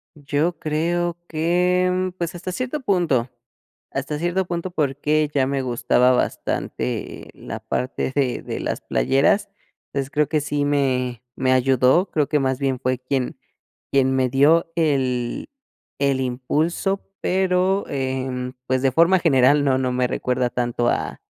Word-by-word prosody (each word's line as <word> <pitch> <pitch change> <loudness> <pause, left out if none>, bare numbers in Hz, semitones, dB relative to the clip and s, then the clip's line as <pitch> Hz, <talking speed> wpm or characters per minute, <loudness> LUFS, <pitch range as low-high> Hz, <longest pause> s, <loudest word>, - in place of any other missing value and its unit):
Yo 150 +3 -1
creo 170 +3 -1
que, 180 +3 +2
mm, 185 0 0
pues 170 -2 -3
hasta 180 +1 -5
cierto 255 +9 -3
punto 170 - +1 0.6
hasta 150 -1 -3
cierto 175 +3 0
punto, 175 +1 -3
porque 150 0 0
ya 135 -2 +2
me 140 0 -1
gustaba 125 0 +2
bastante - - -3
la - - -7
parte 130 +1 -2
de 135 -4 0
de - - -4
las - - -3
playeras. 135 - +2 0.4
Entonces 135 -1 -4
creo 150 0 +2
que 155 -2 +1
sí 145 0 -1
me 130 -4 0
me 130 -1 +2
ayudó, 130 +7 +3
creo 150 -3 +1
que 150 - +2
más 130 -1 0
bien 135 -2 -1
fue 130 -1 -1
quien 130 0 -2 0.5
quien 130 -1 +3
me 130 -1 +2
dio 155 +6 +4
el 130 -7 0 0.5
el 140 -1 +1
impulso, 150 +10 -1 0.2
pero, 185 +1 +1
em, 130 -2 -3
pues, 130 0 +1
de 135 - +3
forma 170 +6 +4
general 145 -3 +4
no 130 -2 +3
no 130 -1 0
me 125 0 +1
recuerda 125 0 -1
tanto 120 -1 -1
a - - -2
140 Hz, 150 wpm, -22 LUFS, 130-170 Hz, 0.6 s, dio